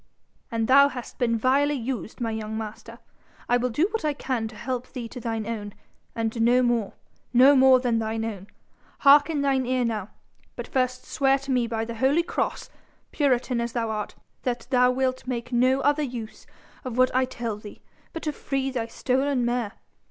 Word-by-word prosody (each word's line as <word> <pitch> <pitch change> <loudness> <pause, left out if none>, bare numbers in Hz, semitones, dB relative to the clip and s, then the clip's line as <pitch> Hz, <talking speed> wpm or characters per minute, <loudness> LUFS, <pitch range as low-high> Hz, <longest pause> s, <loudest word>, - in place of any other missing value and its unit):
And 225 -1 -1
thou 280 +2 +7
hast 250 -3 -8
been 230 -2 +2
vilely 275 +5 +2
used, 245 -3 -5
my 230 -2 -1
young 220 0 -4
master. 220 -1 -7 0.5
I 245 - +3
will 250 +1 -1
do 300 +10 +1
what 450 -4 -2
I 300 -1 +1
can 255 -5 -2
to 220 - -11
help 250 +2 -4
thee 240 -2 -5
to 245 - -9
thine 225 -2 -3
own 210 -3 -5 0.4
and 225 0 -2
no 245 +2 +4
more 235 -4 0 0.4
no 265 +4 +7
more 260 -1 +6
than 240 -3 +1
thine 225 0 -2
own. 200 -4 -6 0.5
Hark 290 +2 +7
in 295 -3 -1
thine 265 -2 +1
ear 255 -1 +1
now. 215 -3 -3 0.5
But - - -6
first 255 -1 -1
swear 270 -1 +2
to 275 0 -6
me 245 -2 +2
by 225 -1 -2
the 235 - -6
holy 275 +8 +3
cross, - - -3 0.4
puritan 255 -4 +1
as 235 0 -3
thou 230 -2 -1
art, 210 -1 -4 0.3
that 245 -1 -3
thou 250 -1 +5
wilt 255 0 -1
make 245 -1 -4
no 255 +3 +3
other 290 +2 +2
use 240 -6 -6 0.4
of 250 -3 -5
what 255 0 +4
I 260 0 +3
tell 235 -4 -4
thee 210 -1 -12 0.3
but 330 - -7
to 305 - -1
free 270 -2 -2
thy 235 -3 -2
stolen 260 +1 0
mare. 240 -3 -1
250 Hz, 195 wpm, -25 LUFS, 230-265 Hz, 0.5 s, thou